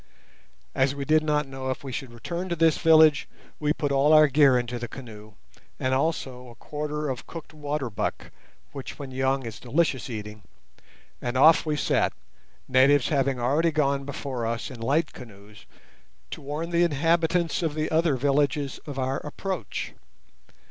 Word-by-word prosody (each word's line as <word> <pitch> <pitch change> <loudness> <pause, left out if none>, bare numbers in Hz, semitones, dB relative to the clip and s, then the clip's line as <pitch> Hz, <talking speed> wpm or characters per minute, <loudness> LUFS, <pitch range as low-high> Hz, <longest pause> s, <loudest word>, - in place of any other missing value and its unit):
As 130 +1 +1
we 140 -1 -4
did 155 +1 +4
not 150 -1 +1
know 135 -1 -5
if 130 - -4
we 135 - -6
should 125 0 -5
return 170 +10 -5
to 170 - -1
this 165 -1 +3
village, 155 -3 +5 0.3
we 150 -1 +1
put 145 -2 -1
all 140 +3 +4
our 155 0 +8
gear 140 -2 +5
into 120 0 -3
the 120 - -4
canoe, 110 -4 -11 0.5
and 130 0 0
also 130 -3 -2
a 120 - -14
quarter 150 +3 -4
of 130 -3 -5
cooked 165 -1 -9
water 145 -2 -3
buck, 100 -4 -4 0.4
which 135 -2 -8
when 140 -2 -7
young 130 0 0
is 110 -2 -7
delicious 135 0 0
eating, 105 -2 -7 0.8
and 120 +1 -2
off 160 +4 +6
we 150 - +1
set, - - +1 0.5
natives 130 +1 +4
having 135 -3 +1
already 145 +7 +2
gone 140 -2 +1
before 135 -3 -5
us 115 +4 -3
in 125 - -10
light 150 +7 +1
canoes 105 -3 -14 0.6
to - - -6
warn 150 +4 -4
the 170 0 +2
inhabitants 170 +2 +1
of 160 -3 -1
the 155 0 -2
other 160 -2 +2
villages 140 +1 0
of 140 -2 -6
our 130 +1 -1
approach. 160 - -5
140 Hz, 170 wpm, -26 LUFS, 130-155 Hz, 0.8 s, our